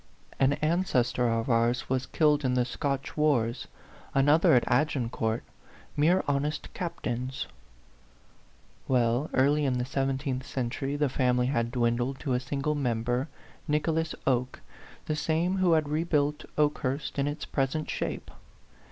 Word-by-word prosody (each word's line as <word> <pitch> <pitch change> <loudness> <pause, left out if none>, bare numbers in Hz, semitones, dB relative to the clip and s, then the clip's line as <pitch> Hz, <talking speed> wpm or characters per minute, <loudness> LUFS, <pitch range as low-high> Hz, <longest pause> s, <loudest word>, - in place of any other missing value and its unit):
An 135 +1 +4
ancestor 130 -8 +1
of 115 0 0
ours 120 0 +1
was 130 0 -1
killed 150 -2 +2
in 125 -1 +1
the 125 -1 +2
Scotch 140 +2 -3
wars, 130 -7 +1 0.5
another 145 +2 +5
at 120 - +4
Agincourt 120 -4 0 0.5
mere 170 +6 +3
honest 145 +1 -1
captains." 130 -7 -3 1.4
Well, 125 +3 +2
early 145 +3 +3
in 135 -2 +1
the 125 - -1
seventeenth 135 0 -1
century, 135 +1 -3
the 145 0 +1
family 125 -1 +1
had 115 -2 0
dwindled 120 +2 0
to 135 -4 -1
a 125 - +2
single 140 +3 -2
member, 125 -1 -1 0.4
Nicholas 160 +1 0
Oke, 125 -1 0 0.4
the 155 - -1
same 165 +4 0
who 185 -3 +3
had 155 -2 +2
rebuilt 150 -1 0
Okehurst 145 -1 0
in 140 - +1
its 145 +1 -4
present 140 +3 -1
shape. - - -4
135 Hz, 135 wpm, -28 LUFS, 125-150 Hz, 1.4 s, another